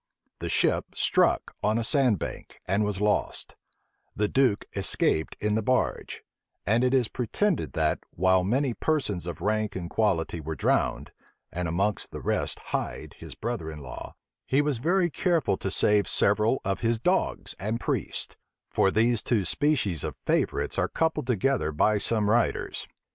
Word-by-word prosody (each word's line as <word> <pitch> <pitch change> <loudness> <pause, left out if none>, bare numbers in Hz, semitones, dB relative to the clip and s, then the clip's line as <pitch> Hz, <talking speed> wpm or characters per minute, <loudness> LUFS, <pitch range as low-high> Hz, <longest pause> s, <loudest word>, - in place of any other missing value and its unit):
The - - -4
ship - - +1
struck - - +2
on 105 +2 +1
a 115 - 0
sand 125 -4 +3
bank, - - -7
and 100 +3 +2
was 105 -2 -2
lost: 105 0 -1 0.6
the 105 +1 +1
duke 125 -4 +2
escaped 80 - 0
in 105 0 0
the 110 - +1
barge; 130 +4 -1 0.4
and 110 +5 +2
it 125 - +3
is 125 -4 +3
pretended 170 - -1
that, 80 -1 +1
while 95 +1 +2
many 125 +6 +1
persons 110 - -1
of 85 - -6
rank 110 -1 0
and 90 -2 -5
quality 90 -6 0
were 80 +1 -4
drowned, - - 0 0.4
and 90 +1 -2
among 100 +6 +1
the - - -7
rest - - -1 0.2
Hyde, - - -3
his - - -9
brother 115 -9 -4
in 80 - -7
law, 65 - -8 0.3
he 135 - +2
was 145 -4 +1
very 175 +5 +2
careful 165 - +1
to 95 - -3
save 105 +1 +3
several 105 +5 +2
of 95 0 -1
his 115 0 +1
dogs 180 +11 0
and 110 +4 -2
priests; - - -3 0.4
for 95 - +3
these 115 +2 +2
two 110 -6 0
species 125 - +1
of - - -4
favorites - - 0
are - - +2
coupled 160 -6 -1
together 125 - +1
by 105 +8 +2
some 110 0 +1
writers. 115 +2 0
105 Hz, 165 wpm, -27 LUFS, 95-125 Hz, 0.6 s, sand